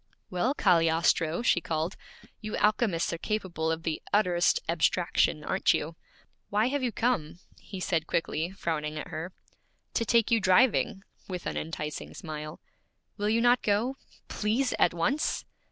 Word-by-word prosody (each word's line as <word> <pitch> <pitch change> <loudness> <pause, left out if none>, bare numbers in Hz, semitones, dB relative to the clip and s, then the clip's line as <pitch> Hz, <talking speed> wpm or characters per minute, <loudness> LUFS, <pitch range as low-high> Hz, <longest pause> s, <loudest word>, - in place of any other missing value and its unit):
'Well, 230 +10 0
Cagliostro!' 165 - +2
she 175 - +3
called. 160 +3 -2 0.4
'You 215 0 -4
alchemists 210 -6 +1
are 170 - -4
capable 175 -6 -2
of 160 0 -3
the 160 -2 -2
utterest 180 - +3
abstraction, - - +1
aren't - - +2
you?' - - -4 0.5
'Why 215 +4 +2
have 285 +1 -1
you 250 -2 0
come?' 215 -11 -1 0.2
he 190 - -8
said 165 -3 -1
quickly, 165 0 -1
frowning 155 -5 -3
at - - -6
her. 165 +4 -5 0.6
'To 230 - +1
take 230 +1 +3
you 230 - +5
driving,' 195 0 +3 0.2
with 180 -2 -5
an - - -3
enticing 150 -1 -5
smile. 155 -2 -7 0.6
'Will 205 0 0
you 225 +1 +2
not 245 +1 +4
go? 220 +6 +1 0.3
Please, 235 +5 0
at - - +5
once?' 250 - -1
185 Hz, 150 wpm, -28 LUFS, 165-225 Hz, 0.6 s, you